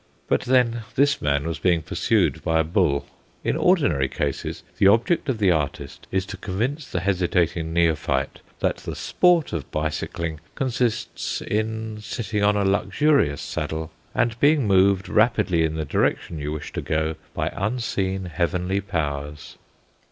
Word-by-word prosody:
But - - +2
then 120 -2 +2
this 140 +1 +3
man 70 0 +1
was 85 -2 -3
being 85 -3 +2
pursued - - +1
by 80 0 +2
a - - +4
bull. 80 -4 +1 0.4
In - - 0
ordinary 85 - +2
cases 70 -2 -3 0.2
the 95 - +6
object 115 - +3
of 130 - 0
the 100 -4 +3
artist 75 -4 -3
is 95 0 0
to 95 - -7
convince 120 +11 -3
the 90 - -2
hesitating 90 -3 0
neophyte 75 -5 +1 0.2
that - - +1
the - - -6
sport 175 -3 +2
of 80 -6 -4
bicycling 80 +1 -3 0.2
consists 125 -3 -1
in 110 0 -2
sitting 110 -1 -3
on 105 0 +4
a 100 - +1
luxurious 100 - +2
saddle, 80 0 -4 0.2
and 115 0 +1
being 145 -2 +4
moved 95 -1 +3
rapidly 105 -6 +3
in 80 -1 -1
the 80 -1 -2
direction 80 +2 0
you 75 +1 -3
wish 75 -1 -6
to - - -3
go 80 +1 -1 0.2
by - - -1
unseen 95 -3 -1
heavenly 90 +3 -1
powers. 75 -6 -4
95 Hz, 150 wpm, -24 LUFS, 80-110 Hz, 0.4 s, the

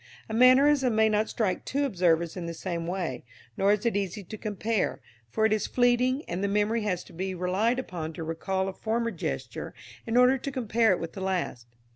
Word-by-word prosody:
A - - -6
mannerism 255 +1 +5
may 220 0 +4
not 215 0 +1
strike 210 -5 -1
two 285 +2 -1
observers 170 -7 +1
in 175 -2 -5
the 170 - -5
same 170 -1 -4
way, 175 -9 -3 0.3
nor 195 +1 +3
is 210 +2 -2
it 235 - +1
easy 200 0 -2
to 205 - -8
compare, 215 0 -2 0.3
for 220 - +1
it 220 - +3
is 215 - 0
fleeting, 250 +3 +2
and 180 +3 -3
the - - +2
memory 210 +3 +1
has 185 -4 -1
to - - -16
be 190 +2 -3
relied 190 +7 +1
upon 170 -11 -4
to 165 - -6
recall 190 +4 -2
a 195 - -4
former 230 +3 -1
gesture 70 - -5 0.3
in 225 +2 +1
order 250 +2 +5
to 275 - -4
compare 230 -4 +2
it 185 - +1
with 165 - -6
the 195 - -7
last. 180 -11 -2
205 Hz, 210 wpm, -27 LUFS, 180-235 Hz, 0.3 s, mannerism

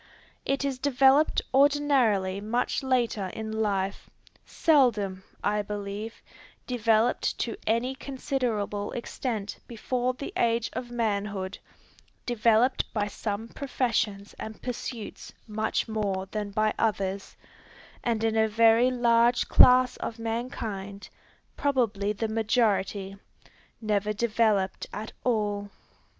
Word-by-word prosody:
It 275 +1 0
is 270 -2 -2
developed 275 +2 +4
ordinarily 265 -9 +3
much 235 +4 -1
later 240 -7 0
in 220 -1 -5
life, 200 -3 -1 0.4
seldom, 215 - +2 0.2
I 210 0 +1
believe, 205 +2 -6 0.4
developed 230 -1 +1
to 230 - -2
any 235 +4 +1
considerable 250 -7 -2
extent 230 -4 -4
before 250 +2 -2
the 280 - -7
age 230 0 +1
of 245 - -5
manhood, 205 -5 -2 0.7
developed 240 +1 +2
by 210 -1 +1
some 210 +1 -4
professions 225 -7 -2
and 220 0 -7
pursuits 240 -2 -6
much 220 +2 -1
more 200 -4 -2
than 210 -1 -3
by 215 +1 +1
others, 195 -3 -1 0.7
and 225 -2 0
in 225 -1 +1
a 220 0 +4
very 230 +3 +5
large 240 -1 +3
class 255 0 +6
of 230 - -5
mankind, 225 -4 -5 0.5
probably 225 -8 0
the 215 +2 -2
majority, 205 -3 0 0.6
never 210 -1 0
developed 215 -3 +1
at 215 +1 -6
all. 205 -4 0
220 Hz, 110 wpm, -27 LUFS, 205-245 Hz, 0.7 s, class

